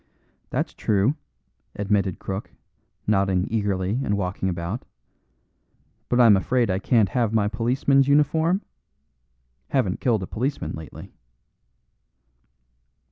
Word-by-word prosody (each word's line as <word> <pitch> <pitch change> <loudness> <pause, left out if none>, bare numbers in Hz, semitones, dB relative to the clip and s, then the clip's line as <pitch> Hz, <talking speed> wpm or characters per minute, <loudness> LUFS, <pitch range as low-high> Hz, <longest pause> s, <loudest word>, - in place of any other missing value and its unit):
"That's - - -2
true," 105 +5 +1 0.6
admitted 100 -2 0
Crook, 95 +1 -5 0.6
nodding 95 -3 +2
eagerly 100 0 0
and 100 -4 0
walking 95 0 -2
about. 85 +6 -4 1.3
"But 125 - +2
I'm 115 -4 +7
afraid 120 +3 +1
I 95 - 0
can't 110 -1 +3
have 115 0 0
my 105 -2 +3
policeman's 130 +5 +2
uniform? 160 +6 +2 1.1
Haven't 105 -9 0
killed 110 -6 +1
a - - -2
policeman 130 +9 -3
lately." 80 -1 -9
105 Hz, 105 wpm, -24 LUFS, 95-125 Hz, 1.3 s, I'm